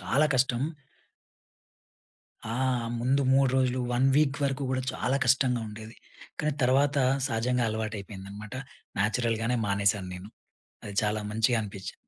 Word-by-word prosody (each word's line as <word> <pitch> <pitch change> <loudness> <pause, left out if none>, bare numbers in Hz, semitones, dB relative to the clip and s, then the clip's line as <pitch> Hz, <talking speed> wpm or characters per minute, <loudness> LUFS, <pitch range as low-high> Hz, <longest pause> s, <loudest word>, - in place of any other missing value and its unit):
చాలా 150 +3 +2
కష్టం. 125 -1 +2 1.9
ఆ! - - -2 0.5
ముందు 135 +4 +2
3 135 0 +4
రోజులు, 130 -1 +1
1 125 +2 +3
వీక్ 145 -2 +3
వరకు 135 0 -1
గూడా 130 0 0
చాలా 130 - 0
కష్టంగా 125 -3 +3
ఉండేది. 110 +2 -10 0.4
కానీ, 150 0 0
తర్వాత 140 +3 +3 0.3
సహజంగా 125 0 0
అలవాటు 110 0 -3
అయిపోయిందనమాట. 100 +2 -9 0.5
నేచురల్‍గానే 115 +2 +1
మానేసాను 100 -1 +1
నేను. 90 +3 -10 0.6
అది 105 - -7
చాలా 105 0 0
మంచిగనిపించింది. 110 -3 -1
120 Hz, 120 wpm, -28 LUFS, 105-130 Hz, 1.9 s, 3